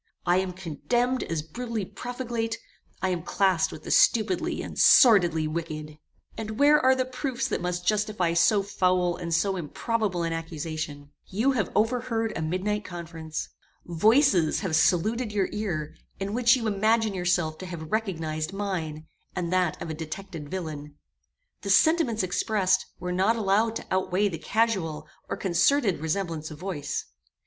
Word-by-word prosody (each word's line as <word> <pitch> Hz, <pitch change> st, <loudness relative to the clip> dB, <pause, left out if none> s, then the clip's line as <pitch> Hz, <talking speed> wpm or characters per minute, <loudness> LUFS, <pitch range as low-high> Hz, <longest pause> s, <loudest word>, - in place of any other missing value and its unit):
I 175 Hz, +1 st, +4 dB
am 185 Hz, -1 st, -1 dB
condemned 240 Hz, -, -1 dB
as 160 Hz, -2 st, -3 dB
brutally 225 Hz, +5 st, -4 dB
profligate: 240 Hz, 0 st, -4 dB, 0.5 s
I 190 Hz, -, +2 dB
am 180 Hz, -2 st, -1 dB
classed 185 Hz, 0 st, +1 dB
with 155 Hz, -, -10 dB
the -, -, -5 dB
stupidly 210 Hz, -6 st, +3 dB
and -, -, -7 dB
sordidly 175 Hz, -10 st, +6 dB
wicked. 155 Hz, -1 st, -5 dB, 0.4 s
"And 220 Hz, -1 st, -5 dB
where 295 Hz, +1 st, +6 dB
are 260 Hz, +1 st, +5 dB
the 260 Hz, 0 st, 0 dB
proofs 255 Hz, -1 st, -3 dB
that -, -, -2 dB
must 180 Hz, 0 st, -3 dB
justify 210 Hz, -4 st, +1 dB
so 195 Hz, +4 st, +4 dB
foul 180 Hz, -2 st, +1 dB
and 170 Hz, -1 st, -6 dB
so 190 Hz, +4 st, +1 dB
improbable 185 Hz, +2 st, -2 dB
an 165 Hz, 0 st, -1 dB
accusation? 155 Hz, -3 st, -5 dB, 0.2 s
You 225 Hz, +8 st, +1 dB
have 245 Hz, -6 st, -1 dB
overheard 225 Hz, 0 st, 0 dB
a -, -, -3 dB
midnight 190 Hz, +6 st, -1 dB
conference. 165 Hz, -3 st, -6 dB, 0.4 s
Voices 185 Hz, -, +3 dB
have 185 Hz, -6 st, -1 dB
saluted 215 Hz, +8 st, +2 dB
your 200 Hz, -2 st, 0 dB
ear, 175 Hz, -8 st, -3 dB, 0.3 s
in 195 Hz, +1 st, -3 dB
which 240 Hz, +1 st, +5 dB
you 240 Hz, -3 st, -3 dB
imagine 215 Hz, +1 st, +2 dB
yourself 175 Hz, -4 st, 0 dB
to 185 Hz, -, -7 dB
have 160 Hz, -3 st, -7 dB
recognized 165 Hz, -6 st, -2 dB
mine, 170 Hz, -6 st, -3 dB, 0.3 s
and 180 Hz, -1 st, -2 dB
that 180 Hz, -4 st, +1 dB
of 160 Hz, -, -5 dB
a -, -, -3 dB
detected 160 Hz, 0 st, -7 dB
villain. 150 Hz, -5 st, -6 dB, 0.7 s
The 200 Hz, -, -5 dB
sentiments 250 Hz, -, +4 dB
expressed 185 Hz, +1 st, +1 dB
were 180 Hz, -, -3 dB
not 190 Hz, +5 st, +2 dB
allowed 220 Hz, +1 st, +1 dB
to -, -, -5 dB
outweigh 190 Hz, +2 st, +1 dB
the 165 Hz, -4 st, -6 dB
casual 165 Hz, -8 st, 0 dB, 0.2 s
or -, -, -2 dB
concerted 195 Hz, -, +2 dB
resemblance 160 Hz, -1 st, -2 dB
of 155 Hz, -, -9 dB
voice. 175 Hz, -4 st, -4 dB
185 Hz, 155 wpm, -26 LUFS, 165-220 Hz, 0.7 s, sordidly